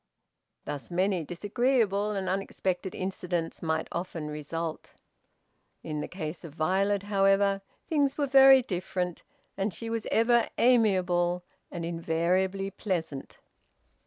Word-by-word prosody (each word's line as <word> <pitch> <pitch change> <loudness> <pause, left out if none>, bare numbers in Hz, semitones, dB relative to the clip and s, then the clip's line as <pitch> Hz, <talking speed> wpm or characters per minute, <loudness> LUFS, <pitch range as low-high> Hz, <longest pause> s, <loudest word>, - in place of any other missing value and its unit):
Thus 145 -2 -6
many 185 0 +1
disagreeable 210 - +1
and 195 -3 -2
unexpected 190 -1 -2
incidents 180 -3 -3
might 160 -1 -1
often 170 -3 -4
result. 155 +2 -5 0.9
In 150 -2 -3
the - - -4
case 170 -2 -6
of 160 -3 -10
Violet, 195 +5 +1
however, 195 0 +3 0.3
things 285 -4 +1
were 290 - +1
very 270 -1 +7
different, 180 -3 -3 0.3
and 200 +2 -1
she 225 +7 -6
was 230 -2 -2
ever 235 +1 +3
amiable 185 -7 +3 0.3
and 170 -1 -5
invariably 175 +4 0
pleasant. 165 -9 -4
185 Hz, 115 wpm, -28 LUFS, 170-205 Hz, 0.9 s, very